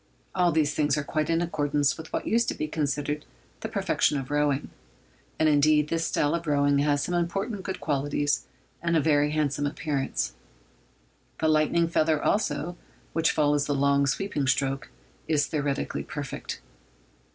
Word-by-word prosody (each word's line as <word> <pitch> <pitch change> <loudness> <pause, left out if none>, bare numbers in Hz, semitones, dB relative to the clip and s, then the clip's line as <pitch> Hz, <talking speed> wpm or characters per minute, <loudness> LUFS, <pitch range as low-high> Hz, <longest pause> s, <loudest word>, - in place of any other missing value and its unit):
All 180 -2 +3
these 150 -2 +2
things 150 -1 +1
are 150 - -1
quite 155 +2 -1
in 165 +1 +2
accordance 145 -3 +1
with 160 0 -10
what - - -2
used 235 +1 +2
to - - -1
be 155 - -3
considered 150 -1 -2 0.4
the - - -5
perfection 145 - +1
of 135 0 -5
rowing; 145 -1 +1 0.7
and, 155 - +3
indeed, 150 0 +4
this 165 0 0
style 145 - +1
of 170 -1 -2
rowing 145 -1 +3
has 145 0 +2
some 180 - -2
important 190 +4 -1
good 190 0 -5
qualities 145 -2 0 0.3
and 170 0 +2
a - - +4
very 145 -1 +3
handsome 145 -1 0
appearance. 140 - -2 1.0
The 160 - +1
lightning 155 +2 +3
feather, 155 -2 +2
also, 175 -3 0 0.4
which 165 0 +2
follows 145 -1 +2
the 145 - 0
long 140 0 +3
sweeping 145 -2 -1
stroke, 135 +1 0 0.4
is 150 -2 +2
theoretically 145 -3 -2
perfect. 145 -4 -6
150 Hz, 160 wpm, -27 LUFS, 145-160 Hz, 1.0 s, indeed